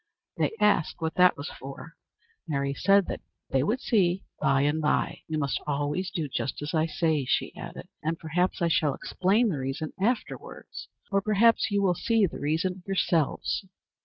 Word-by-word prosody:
They - - 0
asked 210 -6 +3
what 160 -2 -2
that 180 0 +5
was 145 - -6
for. 140 +4 -9 0.5
Mary 140 -2 -1
said 195 +5 +4
that - - -5 0.3
they 135 - +3
would 215 - 0
see 195 -7 +2 0.2
by 135 0 +3
and 145 +2 +1
by. 150 - +1
"You 160 - -2
must 140 -3 -1
always 145 +6 -1
do 165 -3 -3
just 135 - -3
as 150 - -4
I 160 0 +2
say," 160 -3 +1
she - - 0
added, - - -8
"and 160 +2 -1
perhaps 175 +3 -1
I - - +4
shall 155 -4 +2
explain 210 +6 +1
the 155 -8 -2
reason 135 +4 -4
afterwards, 235 +3 -3 0.2
or 195 0 +3
perhaps 225 +4 +4
you 200 -1 +1
will 185 -2 +4
see 225 +5 +1
what 185 - +2
the - - -7
reason 165 +5 0
is - - -33
yourselves." 175 -3 0
165 Hz, 185 wpm, -27 LUFS, 150-195 Hz, 0.5 s, that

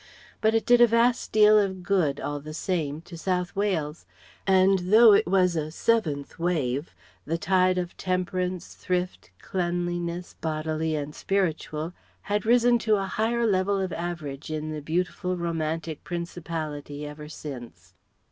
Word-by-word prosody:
But 220 +1 +3
it 225 - +1
did 245 0 +5
a 240 - +9
vast 235 +1 +2
deal 215 0 +6
of 190 -3 -1
good, 175 -7 +1
all 145 0 -3
the 155 +2 -8
same, 160 -4 -2
to 170 +1 -11
South 180 +2 -2
Wales; 170 -7 -1 0.4
and 190 0 +5
though 220 0 +8
it 200 - +4
was 180 -1 +3
a 155 -1 -2
seventh 155 -7 -1
wave, 150 -4 -1 0.3
the 165 +3 -2
tide 185 +1 +2
of 175 -1 -3
temperance, 185 -1 -2
thrift, 180 0 -3
cleanliness, 175 -1 -3
bodily 155 0 -1
and 150 0 -4
spiritual, 165 -4 -2 0.3
has 205 0 -1
risen 240 +1 +4
to 220 -1 +2
a 195 -1 -1
higher 230 +4 0
level 195 -1 +2
of 190 -2 -2
average 160 -5 -5
in 155 0 -3
the 155 -1 -5
beautiful 180 +3 -2
romantic 165 -2 -3
Principality 160 -4 -5
ever 150 +1 -8
since. 120 - -9
175 Hz, 145 wpm, -26 LUFS, 155-195 Hz, 0.4 s, a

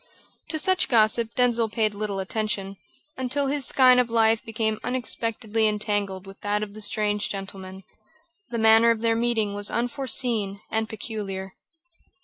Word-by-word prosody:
To 315 - 0
such 370 +4 +2
gossip 225 0 +3
Denzil 235 -2 +2
paid 215 -1 0
little 205 -1 -3
attention, 195 -1 -3 0.4
until 260 +2 0
his 275 -1 -1
skein 255 -1 +5
of 245 -1 +1
life 225 0 +3
became 220 -2 -2
unexpectedly 225 -3 -1
entangled 205 -3 -1
with 195 0 -13
that 210 +1 -1
of 205 -1 -7
the 215 - -9
strange 210 0 0
gentleman. 190 -1 -7 0.7
The 235 - -3
manner 225 +1 +6
of 230 -1 +1
their 230 -1 +2
meeting 225 -3 0
was 205 0 0
unforeseen 235 -5 -1
and 220 0 -1
peculiar. 200 -4 -6
220 Hz, 145 wpm, -25 LUFS, 205-235 Hz, 0.7 s, manner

